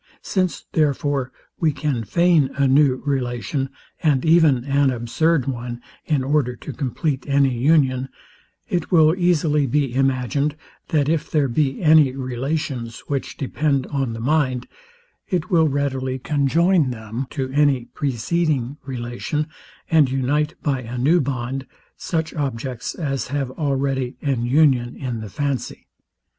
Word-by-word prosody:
Since, 185 -3 -1
therefore, 145 -3 0 0.3
we 160 -2 +3
can 140 -4 -2
feign 170 - +3
a 140 -1 +2
new 135 -1 +3
relation, 135 0 -1 0.3
and 150 -5 +2
even 160 -6 +5
an 140 0 +2
absurd 130 +5 +1
one, 120 -2 -4 0.3
in 145 -4 +1
order 135 -3 +1
to - - -8
compleat 140 0 -2
any 140 -2 +3
union, 135 -1 +2 0.6
it 175 +1 -2
will 160 -3 +6
easily 160 -5 +2
be 140 -1 0
imagined, 135 +2 +1 0.3
that 145 -3 +1
if 160 0 0
there 150 -3 +2
be 135 +4 0
any 150 -4 +5
relations, 130 -2 -3
which 140 -2 -3
depend 140 -1 0
on 135 -4 -1
the 115 - -6
mind, 130 -1 0 0.6
it 180 0 -1
will 165 -3 +4
readily 135 -2 -1
conjoin 150 +4 +2
them 115 +2 -5
to 130 -3 -3
any 140 -3 +2
preceding 140 0 -1
relation, 130 +4 -3 0.4
and 155 -5 +4
unite, 145 +4 0
by 135 -4 0
a 120 +1 -6
new 155 +8 +3
bond, 130 0 -3 0.3
such 160 -2 -3
objects 130 -4 -3
as 135 - -2
have 140 -1 -2
already 135 -3 -1
an 135 -5 0
union 130 -3 +3
in 125 -4 -4
the 110 - -7
fancy. 140 +4 -3
140 Hz, 135 wpm, -22 LUFS, 130-150 Hz, 0.6 s, will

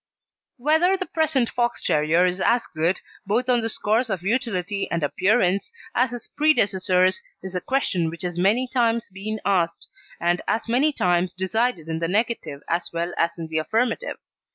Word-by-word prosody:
Whether 320 +8 +3
the 375 - -3
present 310 -8 +1
Fox 240 0 -1
terrier 155 +4 +3
is 180 +1 -1
as 235 0 +3
good, 165 +4 +1 0.3
both 235 +5 +1
on 245 -2 +3
the 225 - -1
score 215 0 +1
of 200 -8 -2
utility 205 -3 -1
and 170 -2 -1
appearance, 195 - +2 0.2
as 250 +1 +2
his 245 0 -6
predecessors 190 -10 +2 0.2
is 190 -1 -6
a 180 - -2
question 185 -11 0
which 170 +3 -7
has 175 -1 -2
many 220 +8 +3
times 235 -4 0
been 215 +3 -4
asked, 175 -4 +1 0.3
and 175 +1 +1
as 225 - 0
many 260 +6 +3
times 180 -7 +1
decided 190 -1 -1
in 160 0 -2
the 165 - -1
negative 195 -7 -1
as 170 +1 -1
well 170 +1 -2
as 170 0 0
in 165 - -5
the 160 0 -1
affirmative. 225 +9 -1
200 Hz, 175 wpm, -23 LUFS, 175-240 Hz, 0.3 s, Whether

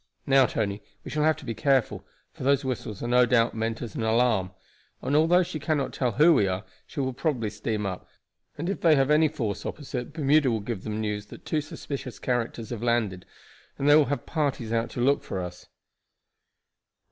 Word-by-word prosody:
Now, 135 -2 +5
Tony, 100 -1 -2 0.2
we - - -6
shall 150 - -1
have 155 -1 +3
to 150 - -11
be 115 - -3
careful, 135 0 +1 0.3
for - - -13
those 140 +1 +2
whistles 120 -5 -4
are - - -2
no 125 0 +4
doubt 115 -1 +3
meant 115 +1 -2
as 115 -5 -7
an - - -4
alarm; 110 -4 +2 0.5
and 140 - 0
although 165 +4 +5
she 170 -3 -5
cannot 145 -3 -1
tell 125 -4 0
who 155 +8 +6
we 105 -9 +3
are, 95 +1 -2 0.2
she 155 - -7
will 130 -1 -1
probably 120 -6 -1
steam 105 0 -3
up, 95 -2 -5 0.5
and 165 - -3
if 195 - -2
they 160 -3 +6
have 135 +1 +2
any 155 +1 +5
force 110 -9 -3
opposite 130 -4 -5
Bermuda 150 -2 +3
will 115 -2 0
give 105 -2 -5
them 110 -1 -3
news 105 -1 -3
that - - -13
two 155 - 0
suspicious 140 -4 -7
characters 115 -2 -2
have 115 -3 -4
landed, 115 -6 0 0.5
and 140 - -1
they 145 - +8
will 155 -1 +6
have 140 -3 -3
parties 140 -7 -1
out 115 0 0
to 120 - -4
look 140 +3 +3
for 95 - -5
us." 90 0 -7
125 Hz, 205 wpm, -26 LUFS, 110-145 Hz, 0.5 s, they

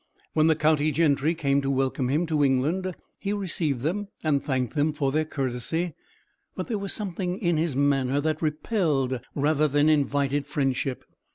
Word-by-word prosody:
When 155 0 +4
the 160 - +4
county 155 0 +2
gentry 150 +1 +2
came 140 -3 +1
to 135 - -2
welcome 135 -1 0
him 155 +6 +1
to 155 -3 +1
England, 155 +8 +1 0.2
he 200 0 -2
received 165 -9 -1
them, 190 +9 -1 0.2
and 145 -3 +1
thanked 130 -3 -1
them 155 0 +1
for 140 -3 0
their 155 +2 +1
courtesy. 145 +5 -2 0.6
But - - -3
there 225 -5 -2
was 200 0 -2
something 185 -3 -3
in 175 -5 +1
his 160 -3 0
manner 140 -1 +2
that 155 +1 -1
repelled 150 - 0 0.2
rather 150 +1 +2
than 145 +2 +3
invited 145 -1 +1
friendship. 135 -3 -1
150 Hz, 170 wpm, -26 LUFS, 140-165 Hz, 0.6 s, When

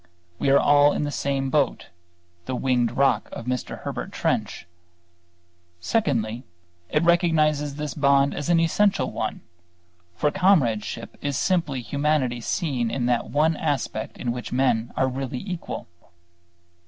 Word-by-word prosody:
We - - +1
are 140 - +6
all 145 0 +5
in - - -1
the 145 - -2
same 135 -2 -1
boat, 145 -2 0 0.6
the 130 - -3
"winged 125 -2 0
rock" 135 -5 +2
of 115 - -7
Mr. 125 0 -3
Herbert - - -5
Trench. - - -2 1.1
Secondly, 120 - -1 0.5
it 150 - +1
recognizes 155 -4 +2
this 150 -1 -4
bond 140 -1 +3
as 145 - -4
the 170 -1 +4
essential 200 +5 +2
one; - - -3 0.7
for 145 - +1
comradeship 135 - +1
is 140 -2 -2
simply 160 -8 0
humanity 140 -3 0
seen 125 -3 -1
in 120 +1 -2
that 120 -1 0
one 155 +2 +2
aspect 125 -7 -3
in 120 - -2
which 120 0 -6
men 120 -3 +1
are 130 - +3
really 130 0 -4
equal. 180 -3 -5
140 Hz, 140 wpm, -24 LUFS, 125-150 Hz, 1.1 s, are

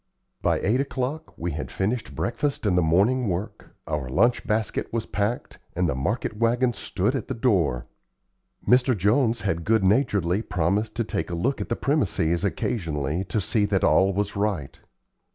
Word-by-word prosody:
By - - +2
eight 120 +7 +2
o'clock 140 +3 -3
we 85 +1 -3
had 75 - -5
finished 110 +5 -2
breakfast 120 +2 -2
and 95 -4 +2
the 90 - +4
morning 100 +10 +2
work, 100 +4 -5
our 75 -5 -3
lunch 120 - +2
basket 110 -1 -1
was 115 -1 -2
packed, 105 +4 -3 0.2
and 90 0 +1
the 80 - 0
market 105 - -2
wagon 120 +2 +2
stood 105 +1 -1
at 130 - -3
the 130 - -3
door. 90 - +1 0.8
Mr. 125 -1 +4
Jones 115 +4 +2
had 95 -5 -1
good 110 0 +2
naturedly 100 - +2
promised 95 +3 -1
to 115 - 0
take 105 -3 -3
a 85 - -3
look 130 +12 -1
at - - -5
the 115 - 0
premises 95 - 0
occasionally 85 - -1
to 105 - -1
see 105 +2 +1
that 100 -2 0
all 95 +6 +4
was 100 +2 -2
right. 100 -9 -2
105 Hz, 170 wpm, -25 LUFS, 90-120 Hz, 0.8 s, the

